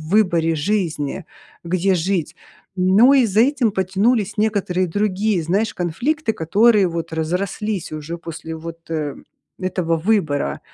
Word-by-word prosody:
выборе 170 -6 +2
жизни, 165 -2 -2 0.4
где 185 +2 +1
жить, 175 -1 -1 0.4
но 195 +9 +5
и 255 -3 +5
за 205 +2 +1
этим 260 -4 +2
потянулись 200 +3 0
некоторые 195 -4 0
другие, 205 0 0
знаешь, 205 +6 0
конфликты, 225 - -1
которые 205 +4 +3
вот 165 -1 -5
разрослись 180 +4 -2
уже 155 +3 -5
после 165 -1 -7
вот, 165 +1 -8
э, 150 -3 -2 0.4
этого 180 -3 -1
выбора. 160 -6 0
185 Hz, 125 wpm, -20 LUFS, 165-210 Hz, 0.4 s, но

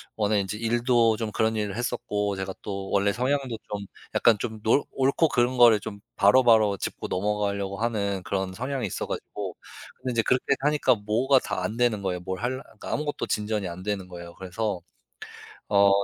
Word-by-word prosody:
원래 105 -1 +2
이제 100 +2 -4
일도 115 -1 +2
좀 110 -2 -3
그런 110 +1 +1
일을 105 -2 -2
했었고 105 -4 -2
제가 95 0 -4
또 95 -1 -5
원래 100 0 +3
성향도 130 +2 0 0.2
좀 100 -1 -4 0.3
약간 115 -3 +4
좀 110 -2 -5
놀 115 +7 +3
옳고 140 +4 +2
그른 125 0 +1
거를 115 -3 +7
좀 100 +1 -7 0.2
바로바로 110 -2 +5
짚고 - - -4
넘어가려고 100 0 -1
하는 100 -4 -1
그런 95 -1 -2
성향이 130 +3 -3
있어 - - -4
가지고. - - -5 0.4
근데 130 -1 -4
이제 115 -1 +2
그렇게 125 +4 +1 0.2
하니까 145 -2 +3
뭐가 115 +6 +2
다 105 -6 -3
안 110 +5 -3
되는 120 -4 +2
거예요. 90 -2 -1
뭘 95 +1 -4
할 130 +2 -1
그러니까 - - -10
아무것도 150 -1 -2
진전이 105 -2 -1
안 85 +1 -7
되는 100 -3 -3
거예요. 85 -1 -10
그래서 95 +1 -3 0.9
어 100 -1 +5
105 Hz, 370 characters per minute, -26 LUFS, 100-120 Hz, 0.9 s, 거를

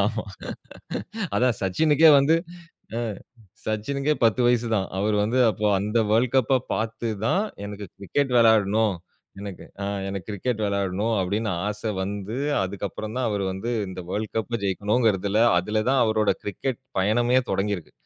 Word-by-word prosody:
ஆமா 110 0 -2 1.1
அதான் 125 -2 +2
சச்சினுக்கே 155 - +5
வந்து 140 +4 +4 0.6
அ - - -1 0.7
சச்சினுக்கே 140 +7 0
10 115 +3 +3
வயசு 120 -1 +2
தான். 95 - 0
அவரு 105 +1 +1
வந்து 120 +5 0
அப்போ 105 0 -2
அந்த 105 +3 0
வேர்ல்ட் 115 +4 +2
கப்ப 130 0 +3
பார்த்து 115 +1 -2 0.2
தான், 195 - +2 0.2
எனக்கு 100 0 -6
கிரிக்கெட் 130 +7 -1
விளையாட்ணும். 110 -2 +4 0.5
எனக்கு, 100 -3 -7 0.2
அ - - -1 0.2
எனக்கு 95 -2 -5
கிரிக்கெட் 110 +3 -2
விளையாடணும் 100 +2 0
அப்பிடின்னு 105 +4 -1 0.2
ஆச 105 0 -5 0.2
வந்து, 100 +3 -4 0.3
அதுக்கப்பறம் 100 +3 -5
தான் 130 -1 0
அவரு 100 -2 -1
வந்து 95 +6 -4 0.2
இந்த 95 0 -6
வேர்ல்ட் 105 +3 -3
கப்ப 115 +1 -1
ஜெயிக்கணுங்கிறதல, 105 +1 +1 0.2
அதில 105 +4 0
தான் 135 - +3
அவரோட 110 -1 +2
கிரிக்கெட் 120 +5 -3 0.2
பயணமே 120 +6 +3
தொடங்கி 100 +2 0
இருக்கு. 85 - -12
110 Hz, 145 wpm, -25 LUFS, 100-120 Hz, 1.1 s, சச்சினுக்கே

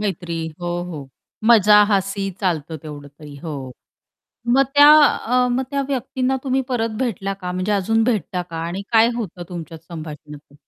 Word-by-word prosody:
मैत्री 175 -4 -3 0.2
हो, 175 - -3
हो, 155 -6 -8 0.4
मजा, 210 -2 +7
हासी 195 0 0
चालतं 165 -4 -2
तेवढं 145 -2 -9
तरी 145 0 -13
हो. 140 -5 -6 0.8
मग 265 +3 +5
त्या 290 +1 +8
अ, 250 -1 +1
मग 250 +2 0
त्या 280 0 0
व्यक्तींना 260 0 -1
तुम्ही 265 0 +1
परत 230 -3 -1
भेटला 195 -6 -2
का 180 0 -4
म्हणजे 185 +3 -1
अजून 225 +3 +1
भेटता 205 -6 -1
का? 170 -2 -10
आणि 185 +4 -4
काय 225 0 +6
होतं 185 -5 -5
तुमच्यात 165 -2 -8
संभाषण 155 -3 -8
असं? 145 -1 -20
195 Hz, 165 wpm, -21 LUFS, 165-230 Hz, 0.8 s, त्या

